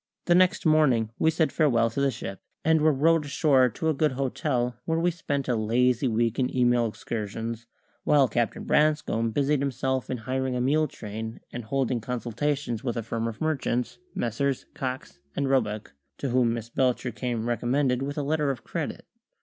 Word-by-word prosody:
The 175 - +4
next 185 +2 +3
morning 135 -9 +3
we 160 - +4
said 160 0 +1
farewell 115 -7 +2
to 140 - -2
the 140 - +3
ship, 100 -5 -6 0.2
and 160 -1 +4
were 155 +1 +5
rowed 160 +3 +3
ashore 140 -3 +3
to 160 +8 -3
a 160 - +3
good 150 -1 +1
hotel, 125 -2 -1
where 165 0 0
we 175 +1 +2
spent 145 -5 -3
a 125 - +1
lazy 120 +4 +2
week 115 0 0
in 130 0 0
email 120 -1 +3
excursions, 115 +1 -5 0.4
while 140 -3 +4
Captain 120 0 -1
Branscome 150 -7 +2
busied 140 +5 +1
himself 130 -1 -1
in 130 - -2
hiring 130 +2 -2
a - - -1
mule 150 +5 +2
train 110 -2 -7
and 120 -2 -5
holding 130 -1 0
consultations 125 +1 -2
with 120 -2 -2
a 115 - -2
firm 115 +1 -2
of 115 -2 -6
merchants, 135 -6 -1 0.2
Messrs. 130 +4 -1
Cox 125 - -5 0.2
and 140 - 0
Roebuck, 110 - 0 0.2
to 140 - -3
whom 125 -1 +3
Miss 115 0 -5
Belcher 125 -1 +1
came 120 -1 -3
recommended 125 +2 +1
with 145 +2 -3
a 145 - 0
letter 150 0 +1
of 135 -4 -3
credit. - - -4
130 Hz, 180 wpm, -26 LUFS, 115-145 Hz, 0.4 s, were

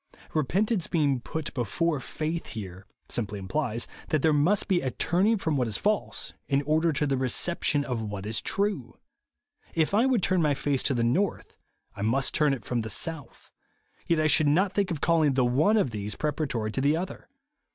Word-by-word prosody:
Kepentance 185 - 0
being 145 -6 +1
put 160 +5 -5
before 145 - -1
faith 160 +5 -4
here, 95 -2 -8 0.2
simply 105 -3 -2
implies, 115 +4 -2 0.2
that 155 -3 +1
there 160 - +4
must 165 +8 +2
be 185 -3 +2
a 130 - -1
turning 190 - +1
from 160 -6 -1
what 125 -3 +1
is 110 - 0
false 210 0 -1
in 140 0 +1
order 160 +3 +2
to 150 0 0
the 135 -2 0
reception 145 +3 +1
of 125 -3 -2
what 105 -2 -5
is 110 +1 -2
true. 195 - -2 0.8
If 160 +3 +1
I 225 +6 +4
v/ould 245 -8 +1
turn 185 -2 +2
my 150 -3 +2
face 140 -1 -1
to 135 - +2
the 120 - +1
north, 175 +12 -1 0.4
I - - -12
m.ust 115 +6 0
turn 150 -2 +3
it 130 - -12
from 120 -2 -1
the 110 - -5
south; 145 +5 -3 0.6
yet 165 -2 +2
I 155 - +2
should 155 0 +4
not 185 +7 +2
think 200 -1 0
of 160 -4 -4
calling 160 -5 +3
the 130 -2 +3
one 150 - +3
of 170 - +1
these 105 -1 -4
pre 150 - -1
paratory 125 -8 -2
to 135 - -1
the 145 +3 +3
other. 185 +6 -6
150 Hz, 200 wpm, -27 LUFS, 120-170 Hz, 0.8 s, there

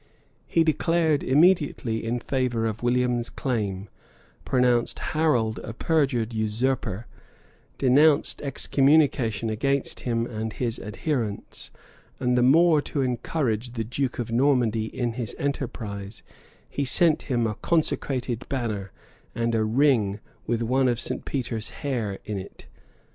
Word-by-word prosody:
He 165 - +3
declared 160 -1 +2
immediately 145 -6 +2
in 120 +2 -1
favor 125 -3 -1
of 110 -1 -3
William's 120 -1 +1
claim; 105 -7 -3 0.6
pronounced 125 -2 +2
Harold 125 -9 0
a 115 - -7
perjured 125 -5 0
usurper; 110 0 -1 0.7
denounced 145 +3 +3
excommunication 135 -5 +2
against 140 +5 -1
him 115 -1 -1
and 110 -2 -4
his 120 -3 -3
adherents; 110 0 -4 0.5
and 125 -1 +1
the 125 - +3
more 155 +4 +5
to 145 -1 -2
encourage 125 -2 -1
the 115 -2 -2
duke 125 +3 -2
of 120 -1 -4
Normandy 120 -4 +2
in 120 +1 -3
his 120 -3 -5
enterprise, 110 -7 -4 0.4
he 140 - -3
sent 155 +4 +3
him 120 -3 +1
a 110 - 0
consecrated 130 -4 -1
banner, 110 -7 -3 0.4
and 115 0 0
a 110 -1 +2
ring 110 -4 +2 0.3
with 120 0 0
one 130 +3 +2
of 120 -2 +1
St. - - -4
Peter's 115 -5 -3
hairs 115 -8 -3
in 105 -2 -3
it. 95 - -11
120 Hz, 125 wpm, -25 LUFS, 110-140 Hz, 0.7 s, more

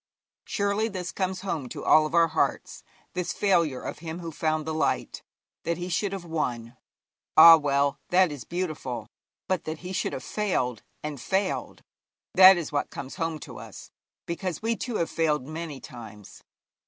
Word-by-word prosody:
Surely 200 +2 0
this 185 -4 -5
comes 190 -1 -2
home 160 -9 -3
to - - -7
all 155 0 +6
of 155 - -4
our 165 -1 +5
hearts - - -1 0.3
this 180 -1 -2
failure 170 -10 +1
of - - -6
him 160 0 -6
who 170 -2 -6
found 155 0 -1
the 160 - -3
light. 155 - -1 0.4
That 170 0 -2
he 175 +1 -5
should 190 +3 0
have 195 -3 -5
won 125 -8 -3 0.6
ah, 165 +1 +12
well, 140 -2 +1
that 180 -2 +4
is 145 -4 -7
beautiful; 155 -10 -4 0.4
but 185 -2 -1
that 155 0 -5
he 185 - -4
should 185 - -1
have - - -5
failed 130 - -1 0.2
and 150 -4 -5
failed, 190 +5 -2 0.5
that 190 0 +9
is 170 - -4
what 145 -1 -1
comes 135 -1 -8
home 165 -1 -2
to - - -9
us, - - -11 0.3
because 170 0 -3
we 230 +1 +1
too 240 0 -4
have 165 - 0
failed 150 -5 +1
many 155 -1 -6
times. 110 -6 -11
165 Hz, 175 wpm, -27 LUFS, 145-185 Hz, 0.6 s, ah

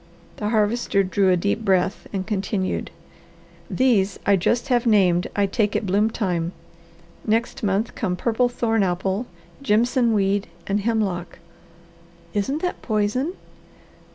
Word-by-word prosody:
The 210 - -2
Harvester 215 -2 +1
drew 190 +1 +2
a 180 - +4
deep 200 +5 -1
breath 190 -1 +1
and 190 -2 -3
continued: 195 -1 -2 0.8
"These 210 -7 +2
I 200 - +5
just 235 +8 0
have 245 -1 +2
named 185 -5 +3
I 205 - +3
take 205 +1 0
at - - 0
bloom 200 +3 +2
time; 180 -6 -2 0.7
next 230 +5 0
month 205 +1 0
come 185 -5 -2
purple 235 +5 +1
thorn 225 -2 0
apple, 190 +4 -1 0.3
jimson 240 0 +2
weed, 200 0 +1 0.2
and 200 +1 0
hemlock." 200 -5 -1 1.0
"Isn't 270 - -1
that 360 - -2
poison?" 220 - 0
210 Hz, 130 wpm, -23 LUFS, 195-230 Hz, 1.0 s, I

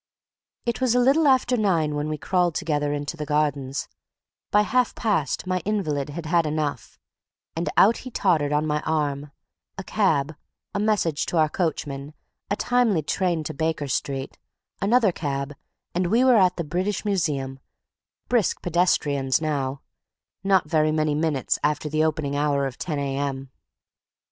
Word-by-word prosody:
It 235 +1 -2
was 250 -2 +2
little 270 +5 +4
after 255 -2 +3
nine 170 -9 +1
when 150 +1 -2
we 155 - -2
crawled 175 +1 +1
together 145 -2 0
into 145 +2 -3
the 155 - -5
gardens; 145 -2 -1 0.6
by 210 0 +4
half 250 +4 +1
past 190 - 0
my 185 0 0
invalid 160 -8 -2
had 160 +3 -6
had 165 0 +2
enough, 150 -4 -3 0.6
and 165 +1 -1
out 220 +4 +6
he 255 - -8
tottered 165 - +1
on 150 +1 +1
my 150 -1 0
arm; 145 -2 -1 0.5
a 195 - -5
cab, 155 -8 +1 0.4
a - - -1
message 205 -8 +1
to 175 - -1
our 155 -1 +4
coachman, 150 -4 -3 0.3
a 200 - +1
timely 230 -8 +2
train 175 0 0
to - - -5
Baker 160 0 -1
Street, 135 0 -3 0.4
another 215 0 +4
cab, 140 -3 -3 0.4
and 180 +1 0
we 230 +7 +3
were 255 -3 +6
at 185 -3 +4
the 170 - -1
British 185 +7 -2
Museum—brisk 155 - -3
pedestrians 150 -6 +1
now—not 155 +5 -2
very 155 -1 +2
many 155 -1 +1
minutes 150 -3 0
after 150 +1 0
the 155 +1 +1
opening 150 -2 -1
hour 145 -1 +1
of 135 -2 -6
10 155 -5 -3
A.M. 135 -1 -3
155 Hz, 150 wpm, -24 LUFS, 145-190 Hz, 0.6 s, out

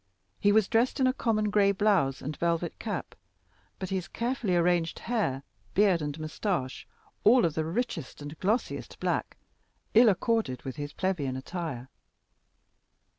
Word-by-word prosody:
He 205 - +4
was 215 -1 +4
dressed 240 +5 +2
in 260 - +4
a 255 - +3
common 215 -5 0
gray 200 -1 +4
blouse 195 -10 +2
and 150 +2 -4
velvet 170 +1 -1
cap, - - -4 0.6
but 190 0 -5
his 185 -2 -2
carefully 235 -5 -1
arranged 170 -1 +2
hair, 200 - -1 0.3
beard 195 -4 +4
and 150 +1 -4
moustache, 155 -3 -3 0.4
all 235 +1 +6
of 165 - 0
the 160 0 -1
richest 190 - -3
and 145 +1 -7
glossiest 215 +6 -1
black, - - -1 0.6
ill 230 +1 +7
accorded 210 - 0
with 135 +1 -6
his 145 0 -4
plebeian 150 -9 -1
attire. 140 -4 -5
185 Hz, 145 wpm, -29 LUFS, 150-215 Hz, 0.6 s, ill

